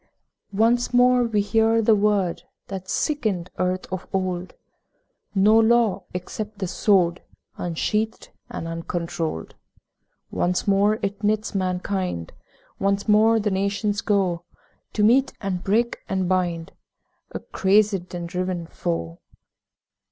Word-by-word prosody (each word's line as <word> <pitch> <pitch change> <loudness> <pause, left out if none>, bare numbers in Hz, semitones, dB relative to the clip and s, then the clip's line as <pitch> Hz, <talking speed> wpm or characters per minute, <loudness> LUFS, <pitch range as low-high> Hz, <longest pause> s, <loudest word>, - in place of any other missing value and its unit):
Once 240 +3 +2
more 250 0 +5
we 215 -3 +1
hear 225 +2 +2
the 225 0 +4
word 205 -4 +1 0.3
That 190 -1 -6
sickened 215 - -1
earth 185 0 0
of 185 - -5
old: 185 -2 -2 0.8
'No 210 +3 +5
law 225 -2 +3
except 205 +4 -6
the 195 - -2
Sword 180 -2 +2 0.4
Unsheathed 210 +6 -2 0.2
and 165 - -5
uncontrolled.' 165 - -4 0.8
Once 180 +3 0
more 200 +2 +3
it 200 +1 -3
knits 215 +1 0
mankind, 185 - -2 0.5
Once 200 +1 0
more 220 +2 +5
the 210 -1 0
nations 200 +2 0
go 195 -6 +1 0.5
To 210 - +1
meet 255 +5 +4
and 190 -3 -3
break 230 +4 +1
and 190 -1 0
bind 175 -3 -1 0.6
A - - -5
crazed 195 -2 +1
and 175 -1 -4
driven 180 -1 -3
foe. 85 - -4
195 Hz, 120 wpm, -23 LUFS, 180-215 Hz, 0.8 s, more